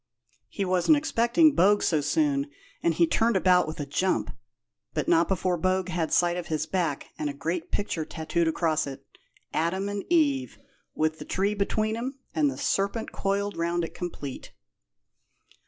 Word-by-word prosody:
He 200 - -2
wasn't 185 - +4
expecting 290 +1 +3
Bogue 205 +1 +4
so 155 -3 +2
soon, 285 - +1 0.3
and 170 -1 +1
he 170 - +4
turned 225 +7 +2
about 180 -2 +4
with 155 - -6
a 145 - -2
jump, 180 +7 -1 0.6
but - - -1
not 165 +1 +4
before 185 -1 0
Bogue 185 +1 0
had 170 -3 -1
sight 175 0 +3
of 175 - -5
his 155 -1 -1
back 170 -7 -2
and 150 - -1
a 140 - -6
great 165 +4 -3
picture 175 -5 -1
tattooed 160 +2 -1
across 160 -2 +1
it 135 -1 -8 0.5
Adam 185 +5 0
and 205 -1 -3
Eve, 290 -6 +2 0.4
with 155 0 0
the - - -6
tree 200 +2 0
between 215 +2 0
'em, 260 +4 -4 0.2
and 150 -3 +2
the 130 - -6
serpent 200 - -1
coiled 200 +1 -1
around 170 +1 0
it 165 - -5
complete." 145 -6 -6
180 Hz, 170 wpm, -27 LUFS, 160-205 Hz, 0.6 s, wasn't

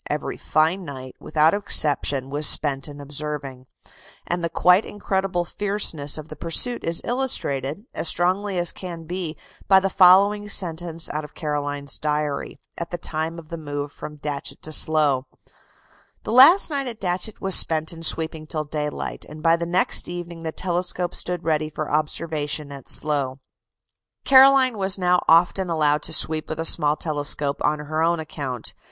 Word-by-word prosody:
Every - - -3
fine 160 +5 0
night 130 -4 -9
without 155 +1 +2
exception 145 -8 0
was 145 +1 +4
spent 140 -2 +3
in 145 -1 -10
observing: 145 -2 -5 0.6
and 175 0 -3
the 170 - -1
quite 180 +4 +4
incredible 190 -3 -2
fierceness 185 -9 -1
of 155 -1 -8
the 155 - -10
pursuit 170 - -1
is 165 0 0
illustrated, 200 - -2
as - - 0
strongly 185 +4 0
as 175 -1 0
it - - -24
can 175 -3 -8
be, 170 -1 -5 0.3
by 190 -1 +6
the 195 0 -2
following 200 +3 +5
sentence 170 -3 -2
out 155 +1 -4
of 150 - -12
Caroline's 145 -2 -3
diary, 150 -1 -3 0.2
at 170 0 -5
the 175 - -4
time 160 0 -4
of 160 -2 -12
the 170 -1 -6
move 145 -1 -5
from 150 +1 -9
Datchet 145 0 -6
to 155 - -5
Slough: 145 -5 +2 1.0
"The - - -5
last 285 - +7
night 275 -2 -2
at 230 -2 -7
Datchet 185 +2 -3
was 195 0 0
spent 160 -1 +5
in 165 - -10
sweeping 160 -1 +1
till 155 -1 -3
daylight, 150 0 -5
and 155 0 -11
by 165 0 +4
the 170 0 -4
next 180 +2 0
evening 175 -1 -7
the 160 -1 -4
telescope 180 0 -2
stood 180 -1 -2
ready 155 -1 0
for 155 0 -5
observation 150 -1 -1
at 140 -2 -10
Slough." 140 -3 -1 0.9
Caroline 265 -3 +6
was 190 0 +4
now 180 -1 +2
often 175 +3 +3
allowed 150 -2 +1
to - - -2
sweep 155 0 +2
with 155 - -5
a 165 - -2
small 150 -2 +5
telescope 145 -2 -2
on 150 +1 +1
her 155 +2 -4
own 170 +1 +1
account. 140 -6 -4
160 Hz, 170 wpm, -22 LUFS, 150-180 Hz, 1.0 s, last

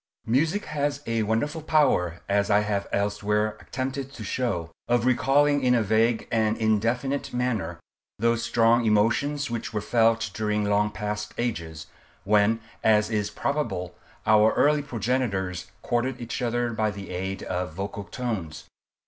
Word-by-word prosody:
Music 155 - +1
has 145 -1 -2
a 115 -1 0
wonderful 115 +9 -1
power, 115 - +2
as 100 0 +1
I 105 0 +4
have 105 -1 -1
elsewhere 105 +1 0
attempted 135 +1 -4
to 110 - -8
show, 95 -8 -2 0.2
of 120 -1 +2
recalling 140 +3 +3
in 125 -1 +4
a 115 - +2
vague 110 +2 +2
and 110 -1 +1
indefinite 115 +6 0
manner, 110 -10 -1 0.4
those 115 +1 +1
strong 115 0 +3
emotions 120 +6 +1
which 115 -1 -4
were - - +2
felt 115 -1 +2
during 105 -1 0
long 105 +1 +2
past 105 0 -4
ages, 85 -10 -3 0.4
when, 105 +3 +3 0.2
as 105 0 +3
is 105 -2 0
probable, 110 - -2 0.3
our 110 0 +5
early 150 0 +3
progenitors 115 - -2 0.2
courted 120 +2 -1
each 120 +1 -4
other 120 0 0
by 110 0 +1
the 100 -3 -7
aid 95 +2 -4
of 90 -3 -3
vocal 100 +1 -5
tones. 105 -12 -4
110 Hz, 145 wpm, -26 LUFS, 105-125 Hz, 0.4 s, our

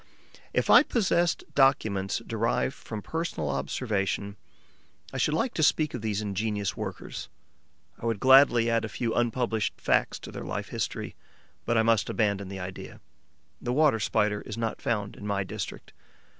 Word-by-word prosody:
If - - +1
I - - +10
possessed 175 - +1
documents 110 -7 +2
derived 115 +4 0
from 110 -3 -7
personal 160 - -3
observation, 100 - -2 0.8
I - - -3
should 150 - +2
like 240 +9 0
to - - -1
speak 155 0 +3
of 125 - -4
these 105 -1 -1
ingenious 105 -1 -2
workers; - - -6 0.7
I 115 - -3
would 115 -3 0
gladly 130 -2 +6
add 115 -1 +2
a 110 - -3
few 115 +1 -2
unpublished 120 -2 0
facts - - +1
to - - -8
their - - -7
life - - -4
history. - - -4 0.5
But 120 0 +1
I 110 - +4
must 115 -2 +2
abandon 100 -3 0
the 95 0 -6
idea. 90 0 -7 0.6
The 120 - -2
Water 145 -5 +4
Spider 105 -1 +1
is - - -7
not 115 -1 -3
found 105 -3 -1
in 105 - -8
my 100 -1 0
district. 95 - -7
110 Hz, 160 wpm, -28 LUFS, 100-125 Hz, 0.8 s, I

